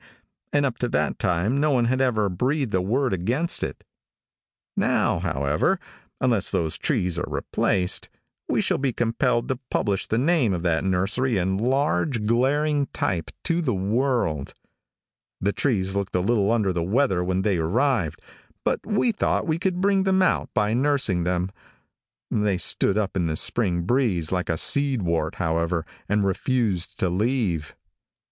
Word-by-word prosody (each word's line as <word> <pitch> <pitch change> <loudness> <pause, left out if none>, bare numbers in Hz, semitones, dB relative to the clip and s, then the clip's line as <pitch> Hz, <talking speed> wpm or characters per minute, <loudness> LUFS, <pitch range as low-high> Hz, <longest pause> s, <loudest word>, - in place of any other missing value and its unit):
and 145 -1 +2
up 130 -4 -2
to 125 - -1
that - - -1
time 90 +10 +1
no 155 +1 +2
one 125 -4 +2
had 130 +2 +1
ever 110 -6 +2
breathed 125 - -1
a 95 - +2
word 125 +5 0
against 120 - 0
it. - - -4 0.9
Now, - - +1
however, 75 - 0 0.4
unless 115 -6 +1
those 80 -2 0
trees 90 -2 -1
are - - -2
replaced, 90 -2 0 0.4
we - - +1
shall - - 0
be 135 -2 0
compelled 120 +1 0
to 130 -2 -1
publish 100 -3 -1
the 110 - 0
name 135 - +2
of 85 - -4
that 85 -2 +1
nursery 100 +6 +1
in 95 +1 0
large, 130 -1 0
glaring 140 +5 +2
type, 85 -4 -2
to 170 0 0
the 125 -9 0
world. 100 - -1 0.8
The 100 +2 0
trees 95 -8 0
looked 100 -2 -2
a - - +3
little 105 +1 +2
under 105 -5 +1
the 85 - -1
weather 95 0 +1
when 95 +1 -1
they 100 -3 +1
arrived, 100 - 0 0.4
but - - 0
we 210 +3 +1
thought 215 - 0
we 160 -1 0
could 185 0 -1
bring 195 0 +3
them 190 0 +3
out - - +1
by 105 +1 +2
nursing 125 -9 +1
them. 90 +1 -1 0.8
They 105 -3 +1
stood 95 +3 +2
up 100 -2 -1
in 90 -3 +1
the 80 -1 -2
spring 90 -5 +1
breeze 100 - +1
like 90 -1 -1
a 80 - 0
seed 140 - +2
wart, 85 -2 -1
however, 85 0 -1 0.2
and 105 0 +2
refused 100 -2 0
to 95 - +2
leave. 95 - -1
105 Hz, 165 wpm, -24 LUFS, 90-130 Hz, 0.9 s, a